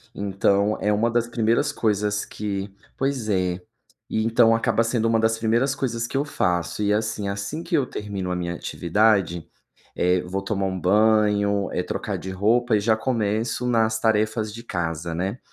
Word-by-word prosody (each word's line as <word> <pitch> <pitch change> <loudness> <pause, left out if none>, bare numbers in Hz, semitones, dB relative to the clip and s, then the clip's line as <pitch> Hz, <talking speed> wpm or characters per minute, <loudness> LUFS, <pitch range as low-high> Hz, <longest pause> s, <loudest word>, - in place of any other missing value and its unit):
Então, 100 +1 +1
é 105 - +1
uma 115 +3 +2
das 120 0 +1
primeiras 120 +5 +1
coisas 105 -4 0
que 100 -1 -4 0.3
pois 135 -5 -1
é. 90 -2 0 0.5
Então, 115 +1 +3
acaba 115 0 +1
sendo 115 -1 0
uma 115 0 +2
das 110 0 +2
primeiras 120 +5 +1
coisas 115 -4 -2
que - - -8
eu 140 - +2
faço 90 - -1
e 105 - +2
assim: 110 -1 -1
Assim 100 +12 -4
que 170 -1 -1
eu 140 -4 +2
termino 100 -5 -5
a 90 - -1
minha 85 -1 -3
atividade, 90 0 +1 0.5
eh, 90 0 +2
vou 95 +2 -4
tomar 100 -1 -1
um 95 -1 -3
banho, 105 0 +3
eh, - - -1
trocar - - -3
de 95 - -7
roupa 110 +5 +2
e - - +3
já 110 +2 +2
começo 110 0 -1
nas 110 -2 +2
tarefas 110 -1 +1
de 115 +2 -9
casa, 85 -4 -3
né. 95 +8 -3
105 Hz, 175 wpm, -23 LUFS, 100-115 Hz, 0.5 s, Então